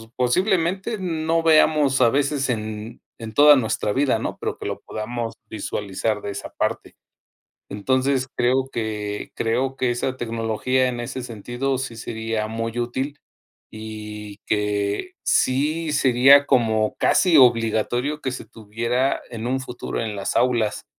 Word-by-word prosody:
posiblemente 185 - +1
no 165 -3 -1
veamos 155 -4 +4
a 120 - +6
veces 140 0 0
en 110 0 -4 0.2
en 110 -1 -7
toda 145 +2 +8
nuestra 110 -4 0
vida, 140 -1 +2
¿no? - - -4
Pero - - -3
que - - -5
lo - - -4
podamos 115 +1 -4 0.2
visualizar 105 0 -3
de - - -5
esa 100 - -7
parte. - - -2 0.8
Entonces 130 +5 0
creo 130 +2 +2
que 105 -2 -4
creo 130 +4 -1
que 125 -1 0
esa 125 +2 -2
tecnología 115 +3 0
en 120 -1 -4
ese 130 +2 -5
sentido 120 +3 -3
sí 120 -4 -5
sería 110 -1 -3
muy 115 +1 -4
útil 130 +4 -3 0.5
y 105 -1 -8
que 105 - -1
sí 150 +4 +1
sería 135 +1 +6
como 110 -4 +2
casi 180 -4 +4
obligatorio 120 +4 +2
que 130 - -2
se - - -7
tuviera 115 +5 -1
en 115 0 -5
un 130 +1 0
futuro 125 -2 -5
en 105 -2 -4
las 100 - -3
aulas, 120 -4 +1
120 Hz, 140 wpm, -23 LUFS, 110-135 Hz, 0.8 s, toda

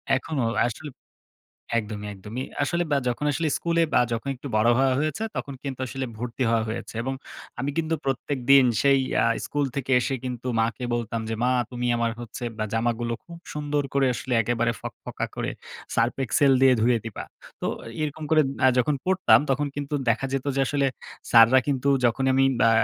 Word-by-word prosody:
এখনো 135 0 -2 0.2
আসলে 135 +6 -5 0.9
একদমই, 105 -1 -5
একদমই। 105 +6 -6 0.2
আসলে 170 +5 0
বা - - +4
যখন 125 +4 -2
আসলে 160 +3 0
স্কুলে 170 0 +1
বা - - +5 0.3
একটু 135 +2 -8
বড় 110 +2 +3
হওয়া 135 0 +3
হয়েছে 155 +7 -2
তখন 140 - -4
কিন্তু 135 -2 -5
আসলে 135 +1 -4
ভর্তি 120 +2 -3
হওয়া 115 -1 +2
হয়েছে। 110 - -5
এবং 135 +2 -2 0.5
আমি 135 +3 -1
কিন্তু 165 0 0
প্রত্যেকদিন 135 0 +3 0.2
সেই 140 -1 +5 0.2
আ - - +2 0.2
স্কুল 145 0 -1
থেকে 135 -1 -3
এসে 120 +3 -1
কিন্তু 125 -1 -5
মাকে 115 +3 -1
বলতাম 115 -1 -2
যে 115 - -1
মা 125 - +3 0.2
তুমি 125 -1 -3
আমার 115 0 +1
হচ্ছে 120 +1 -7
বা 110 - 0
জামাগুলো 115 +1 0
খুব 170 - -11 0.2
সুন্দর 145 -1 -1
করে 140 -1 +3
আসলে 125 +3 -5
একেবারে 120 +1 0
ফকফকা - - -5
করে - - -2 0.4
সার্ফ 115 +2 +2
এক্সেল 140 +2 +3
দিয়ে 130 -1 +6
ধুয়ে 120 +1 +3
দিবা। 115 -3 -6 0.4
তো - - -2 0.4
এরকম 155 +1 -4
আ - - -11
করে 155 -1 +5 0.4
যখন 135 +4 +2
পড়তাম 185 -3 +5
তখন 140 +2 +1
কিন্তু 145 0 -4
দেখা 115 +4 +1
যেত 135 -1 -1
যে - - +2
আসলে, 140 +1 +1 0.4
স্যাররা 115 +3 +7
কিন্তু 140 -1 0 0.2
যখনই 130 +3 +2
আমি 135 0 +4 0.2
বা 115 - +5
130 Hz, 180 wpm, -25 LUFS, 120-145 Hz, 0.9 s, স্যাররা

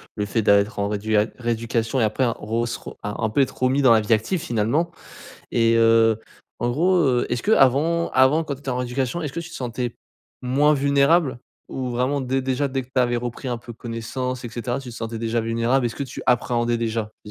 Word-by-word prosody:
le 105 -1 -2
fait 110 +1 0
d'a 100 -1 +6
être 105 +1 -3
en 100 0 0
réduia 105 0 +1
rééducation 115 +1 -1
et - - +3
après, 110 +5 +1
ro 115 +1 -2
se 115 - -3
ro - - -10
un 105 +1 -4
un 110 -1 0
peu 140 +6 +2
être 135 - -1
remis 135 +2 +3
dans 130 -3 +6
la 110 - +5
vie 105 +2 +2
active, 110 - 0
finalement 150 +3 0 0.6
et 115 -1 +3
heu, 115 -1 +4 0.4
en 120 - 0
gros, 175 +8 +2
heu, 125 -2 +2
est-ce 120 - -2
qu'avant 165 - +3
avant, 135 +5 +4
quand 140 - -3
tu 135 - -15
étais 135 - -4
en 125 - -1
rééducation, 125 +5 -2
est-ce 150 -4 -4
que 170 - -2
tu 165 0 -9
te - - -11
sentais 125 -1 -4 0.4
moins 140 +4 +3
vulnérable? 140 0 +3 0.3
Ou 130 -1 -4
vraiment 130 +4 0
dé 130 +1 0
déjà, 130 +2 -1
dès 130 0 -2
que - - -16
tu 130 0 0
avais 120 -1 +1
repris 120 +2 -4
un 120 -1 -2
peu 120 0 -10
connaissance 125 +2 -5
et - - -4
cetera, 120 +2 -3
tu 135 -2 -9
te - - -10
sentais 115 -1 -5
déjà 115 +1 -1
vulnérable? 115 +3 +1
Est-ce 120 - -2
que 140 - -3
tu 130 - -8
appréhendais 120 -1 +1
déjà, 110 -2 -2
je 105 - -10
120 Hz, 230 wpm, -23 LUFS, 115-135 Hz, 0.6 s, d'a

